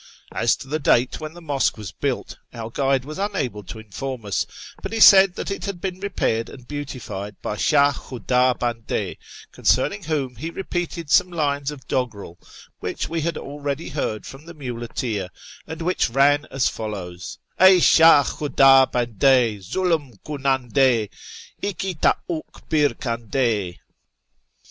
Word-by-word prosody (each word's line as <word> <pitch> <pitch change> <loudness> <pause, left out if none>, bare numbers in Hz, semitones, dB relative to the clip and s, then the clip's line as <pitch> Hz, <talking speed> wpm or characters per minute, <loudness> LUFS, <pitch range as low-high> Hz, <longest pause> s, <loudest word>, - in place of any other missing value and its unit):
As 115 - +2
to - - -11
the 155 +3 -2
date 125 -3 +2
when 155 +1 -7
the 175 - -12
mosque 140 -6 0
was 105 -4 -7
built, - - -3 0.2
our 115 -1 -6
guide 135 0 +1
was 155 +5 -7
unable 150 - -2
to - - -8
inform 115 +3 -6
us, 100 - -1 0.3
but - - -5
he 225 - -2
said 195 -3 +8
that - - -4
it 195 - -4
had 200 -3 -4
been 185 0 -4
repaired 150 - -1
and 125 -3 -13
beautified 125 -9 -6
by 105 - -2
Shah 145 +5 +4
Ivhuda 125 0 0
Bande, 115 -2 -3 0.4
concerning 200 +10 +1
whom 140 -6 -2
he 160 +7 -4
repeated 170 -3 -4
some 180 - +5
lines 145 -4 -1
of 140 -3 -9
doggerel, 105 -9 -3 0.4
which - - -4
we 165 0 -2
had 170 +1 -2
already 145 +1 -5
heard 110 -7 -3
from 135 +3 -11
the 170 - -10
muleteer, 120 -6 -4 0.4
and 160 +1 -6
which 180 -6 +1
ran 145 +4 +3
as 135 -2 +1
follows: 90 -5 -6
— - - -47
" - - -32
Ey 190 0 +8
Shah 165 -3 +7
Khudu 135 -3 +4
Bande, 120 -1 +2
Zulm 150 - -1
kunande, 130 -5 +1 0.5
Ihi 190 -2 -3
toy'dk - - +4 0.5
Mr 150 -4 +2
kande 115 -5 -1
135 Hz, 155 wpm, -22 LUFS, 115-160 Hz, 0.5 s, said